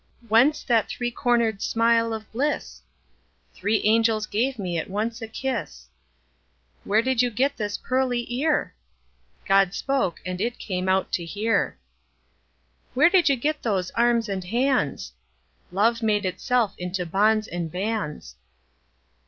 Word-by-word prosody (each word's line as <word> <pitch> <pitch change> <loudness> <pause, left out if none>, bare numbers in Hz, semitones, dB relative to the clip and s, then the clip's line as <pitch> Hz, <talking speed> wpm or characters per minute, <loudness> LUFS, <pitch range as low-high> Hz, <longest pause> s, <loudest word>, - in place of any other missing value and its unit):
Whence 255 +8 +4
that 230 -4 +2
three 240 -1 -3
corner'd 235 -4 +1
smile 230 0 +2
of 220 -1 -6
bliss? 280 +6 -2 0.7
Three 210 +1 0
angels 220 0 +3
gave 245 +5 -1
me 180 -5 -2
at - - -6
once 225 +4 -3
a 225 - -5
kiss. 225 - -4 0.9
Where 215 +3 +2
did 260 -1 +2
you 245 - +2
get 265 +5 0
this 205 -2 -3
pearly 255 -2 -1
ear? 295 +5 0 0.7
God 195 -1 +3
spoke, 270 -11 -1
and 185 0 -4
it 235 +2 -1
came 185 -2 -3
out 190 0 +1
to 175 - -1
hear. 210 - -1 1.2
Where 300 +6 +5
did 365 -5 +4
you 275 - +4
get 300 +5 -2
those 190 -5 -1
arms 235 -1 +2
and 195 -2 -3
hands? 240 - 0 0.6
Love 225 +5 +2
made 210 -2 +1
itself 210 +4 0
into 180 0 -3
bonds 215 +5 +2
and 170 -2 -4
bands. 185 - -4
225 Hz, 140 wpm, -24 LUFS, 195-245 Hz, 1.2 s, Where